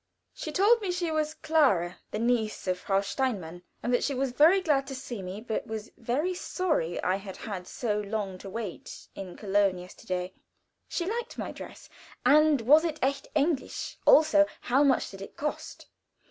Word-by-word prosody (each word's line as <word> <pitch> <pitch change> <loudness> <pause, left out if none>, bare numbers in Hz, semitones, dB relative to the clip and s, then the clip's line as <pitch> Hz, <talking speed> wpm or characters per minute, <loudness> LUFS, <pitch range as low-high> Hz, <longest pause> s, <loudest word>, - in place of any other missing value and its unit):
She 310 - -6
told 420 +8 +4
me 390 -3 -1
she 355 -2 -1
was 310 0 -1
Clara, 280 - +2
the - - -4
niece 230 -1 0
of 185 -1 -1
Frau 195 +1 +1
Steinmann, 200 -6 -2 0.2
and 245 - 0
that 245 - +2
she 280 - 0
was 265 0 0
very 315 +9 +6
glad 290 -7 +1
to 270 - -5
see 245 -5 -6
me, 190 +3 -6
but 220 -1 -3
was 220 0 -6
very 265 +10 -1
sorry 320 - -1
I 185 +1 +2
had 195 -1 -9
had 190 -5 -6
so 210 -4 -2
long 200 -2 -3
to 195 - -8
wait 205 -3 -7
in 185 -2 -8
Köln 200 -2 +2
yesterday. 180 0 -5 0.5
She 345 - -2
liked 465 +5 -4
my - - -4
dress, - - -10 0.4
and 305 -2 +5
was 295 +8 +6
it 320 -3 -2
echt 275 +1 0
Englisch 295 -1 -1
also, 305 -1 +6
how 265 +4 +3
much 275 -3 +2
did 195 -1 -10
it 195 - -10
cost? 300 +1 -4
245 Hz, 180 wpm, -28 LUFS, 195-305 Hz, 0.5 s, very